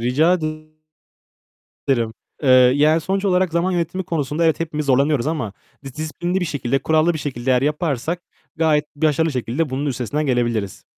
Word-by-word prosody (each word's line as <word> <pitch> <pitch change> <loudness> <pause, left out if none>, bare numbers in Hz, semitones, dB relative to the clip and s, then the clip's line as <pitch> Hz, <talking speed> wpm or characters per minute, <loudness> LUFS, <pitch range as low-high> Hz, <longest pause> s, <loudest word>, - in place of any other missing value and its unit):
Rica 140 +9 +3
ede 155 -2 -5 1.2
ederim. 115 -4 +1 0.3
Eee, 135 - +1
yani 140 +5 +5
sonuç 195 +5 -2
olarak 185 -2 +2
zaman 170 +3 +1
yönetimi 175 +2 -2
konusunda 160 -2 -1
evet 160 0 +2
hepimiz 150 -2 -3
zorlanıyoruz 140 0 +2
ama 155 -11 -2 0.3
dis 135 0 -9
disiplinli 175 +4 -2
bir - - 0
şekilde, 135 -4 -1
kurallı 160 +3 +2
bir - - -3
şekilde 130 -3 -3
eğer 125 0 +3
yaparsak 150 +2 -1 0.3
gayet 155 -2 +2
başarılı 155 +1 +1
şekilde 130 +4 -2
bunun 135 +3 -2
üstesinden 140 +3 -2
gelebiliriz. 120 -6 -1
150 Hz, 160 wpm, -20 LUFS, 130-165 Hz, 1.2 s, yani